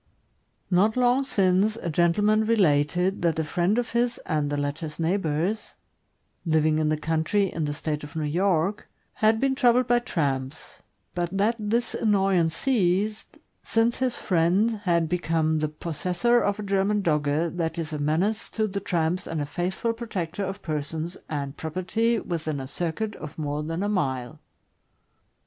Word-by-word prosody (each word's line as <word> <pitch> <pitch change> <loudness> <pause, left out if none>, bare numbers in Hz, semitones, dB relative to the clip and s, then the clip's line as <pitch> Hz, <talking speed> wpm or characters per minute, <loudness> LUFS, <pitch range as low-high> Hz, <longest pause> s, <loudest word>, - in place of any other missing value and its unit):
Not 205 +6 +3
long 250 +2 +3
since, 195 -3 +2
a 175 -7 -4
gentleman 205 +7 +3
related 180 -3 +2
that 170 -3 +1
a 160 - +1
friend 175 +7 +1
of 245 -1 -1
his 240 0 +1
and 150 -3 0
the 145 - -1
latter' 145 +3 -2
s 150 0 -10
neighbors, 170 +3 -1 0.7
living 155 -2 +2
in 155 -1 +1
the 155 - +1
country 160 +6 0
in 160 - -1
the 145 - -2
State 150 -1 -3
of 150 +2 -10
New 155 - -1
York, 180 +4 0 0.3
had 220 +1 +4
been 270 +1 +2
troubled 250 -2 +4
by 240 0 +3
tramps, 140 - -3 0.3
but 175 -1 -1
that 215 +4 +2
this 225 +3 -1
annoyance 195 -6 +2
ceased 210 -3 0 0.2
since 230 +1 +1
his 255 -2 0
friend 190 +6 +2
had 170 -2 +2
become 160 -2 0
the 155 0 0
possessor 180 +9 0
of 200 +1 0
a - - -3
German 200 +1 +1
Dogge 150 +1 +1
that 165 -1 -2
is 160 -1 -4
a 150 - -3
menace 165 +9 0
to 220 - -1
the 200 -1 -3
tramps 175 -2 -1
and 165 - -3
a 145 - -1
faithful 180 +9 -2
protector 205 -6 -4
of 195 +1 -5
persons 160 +2 -3
and 140 -2 -4
property 185 +8 0
within 155 -6 -3
a 135 - -5
circuit 175 +9 -3
of 155 0 -9
more 150 -1 -2
than 165 +4 -3
a - - 0
mile. 130 - -2
175 Hz, 165 wpm, -26 LUFS, 155-210 Hz, 0.7 s, had